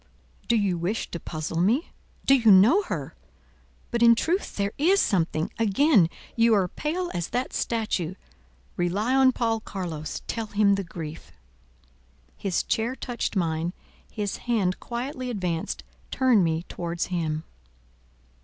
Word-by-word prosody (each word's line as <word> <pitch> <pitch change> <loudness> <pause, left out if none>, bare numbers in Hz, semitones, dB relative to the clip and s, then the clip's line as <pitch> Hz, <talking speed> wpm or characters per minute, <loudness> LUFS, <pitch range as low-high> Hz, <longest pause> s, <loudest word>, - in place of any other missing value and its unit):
"Do 235 - +3
you 195 -5 +1
wish 190 +7 -2
to 170 - -4
puzzle 160 +1 -3
me? 235 - +1 0.3
Do 270 - +6
you 240 -5 +5
know 210 - +7
her? - - -5 0.8
But, 235 -1 -1
in 235 0 +7
truth, 350 - -1
there 200 0 -1
is 370 +7 +4
something. 165 - +1
Again 225 - +4 0.3
you 230 -1 +4
are 190 -3 +2
pale 340 - -3
as 175 -1 -3
that 250 +1 -2
statue. 205 -7 -1 0.6
Rely 200 +8 0
on 265 -1 +6
Paul 230 -3 0
Carlos; 175 -7 -5
tell 225 -2 -3
him 205 -1 +3
the 195 0 0
grief." 165 -3 -8 1.0
His 195 -3 -1
chair 230 +3 -1
touched 245 -4 -3
mine; 165 -1 0 0.4
his 205 -2 -3
hand, 195 -6 +1
quietly 255 +1 -4
advanced, 180 - -3 0.3
turned 255 -7 +3
me 165 0 0
towards 170 -1 -4
him. 160 -2 -1
205 Hz, 140 wpm, -26 LUFS, 175-240 Hz, 1.0 s, know